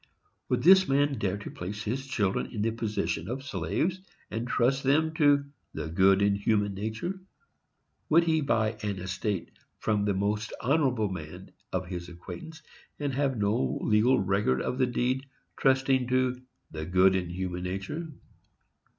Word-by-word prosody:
Would - - +1
this 190 +2 +7
man 140 0 +2
dare 100 0 -1
to 105 - -8
place 100 +4 -6
his 130 +5 -3
children 110 -2 0
in 105 -4 -3
the 115 - +1
position 110 -2 -2
of 130 +3 -4
slaves, 140 - -1 0.3
and 115 +3 -3
trust 125 +2 +2
them 155 +4 +2
to 145 -3 +4 0.3
"the 80 0 -4
good 95 +4 +4
in 100 0 +4
human 100 0 +1
nature"? 110 - -4 0.9
Would 165 +2 +6
he 160 -2 +2
buy 110 -5 0
an 105 -2 -2
estate 95 +1 -3 0.3
from 105 -2 0
the 100 -2 +1
most 105 +3 -1
honorable 125 -6 +1
man 80 -5 -8 0.2
of 95 0 -1
his 90 -1 -6
acquaintance, 160 - -9 0.3
and 145 -2 -2
have 135 -1 0
no 100 - +1
legal 115 +5 +4
record 95 -9 +1
of 125 - -2
the 130 - +3
deed, 125 +2 -1 0.3
trusting 130 -1 +2
to 130 0 +1 0.3
"the 80 -1 -5
good 95 +1 +5
in 90 -2 -1
human 90 0 -4
nature"? 100 - -4
110 Hz, 160 wpm, -28 LUFS, 95-135 Hz, 0.9 s, this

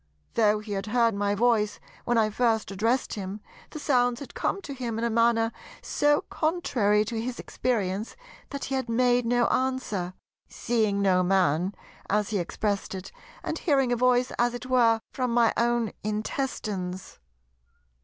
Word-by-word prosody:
Though 215 -2 +3
he 215 0 -9
had 195 +1 -3
heard 230 0 +3
my 200 0 0
voice 215 -2 +2 0.3
when 240 -1 +2
I 215 -1 +3
first 225 -2 +1
addressed 225 +6 0
him, 195 0 -5 0.3
the - - -8
sounds 245 -5 +2
had 280 - -9
come - - -1
to 280 - -6
him 240 -4 -4
in 230 - -2
a 235 - +1
manner 230 0 +3 0.3
so 295 0 +2
contrary 235 - +1
to 225 +1 -3
his 245 +1 -4
experience 215 -4 -2 0.3
that 280 -1 -5
he 270 - -4
had 260 -3 -1
made 245 0 +2
no 245 0 +3
answer, 230 -9 -1 0.3
"seeing 215 -4 0
no 185 -2 +4
man," 180 0 +2 0.3
as 210 +1 +1
he 205 - +1
expressed 200 +3 -2
it, 185 0 -7 0.3
"and - - -3
hearing 270 -7 +2
a - - +3
voice 250 +1 +2
as 240 0 +2
it 245 - -7
were 235 -3 +3
from 255 -2 -1
my 235 -2 +4
own 235 -2 +1
intestines." 210 -4 -3
230 Hz, 165 wpm, -27 LUFS, 205-245 Hz, 0.3 s, no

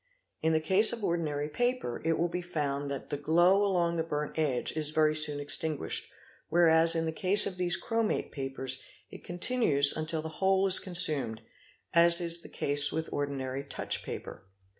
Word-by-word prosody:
In 160 - 0
the 160 - +1
case 190 +7 +5
of 235 -3 -7
ordinary 155 -5 -3
paper, 245 - -3
it 165 +1 0
will 170 - -1
be 175 +1 -5
found 145 -5 -4
that 140 -1 -8
the 145 - -3
glow 175 +7 +2
along 175 -4 -1
the 165 - -1
burnt 150 -2 -5
edge 145 -6 -2
is 155 -1 0
very 155 0 0
soon 150 -1 +3
extinguished, 145 +1 -1 0.4
whereas 165 0 +3
in 165 0 -2
the 160 - -3
case 195 +4 +1
of 185 - -6
these 175 -1 0
chromate 225 -2 -3
papers 135 -1 -5 0.3
it - - -13
continues 175 - +1
until 155 0 -4
the - - -6
whole 190 0 +1
is 190 -1 +8
con 185 -3 -7
sumed, 140 -10 +5 0.5
as 170 +1 +6
is 170 -1 -1
the - - -13
case 145 +1 +2
with 160 0 -5
ordinary 140 -2 -5
touch 140 - -4
paper. 95 - -10
160 Hz, 180 wpm, -28 LUFS, 145-175 Hz, 0.5 s, is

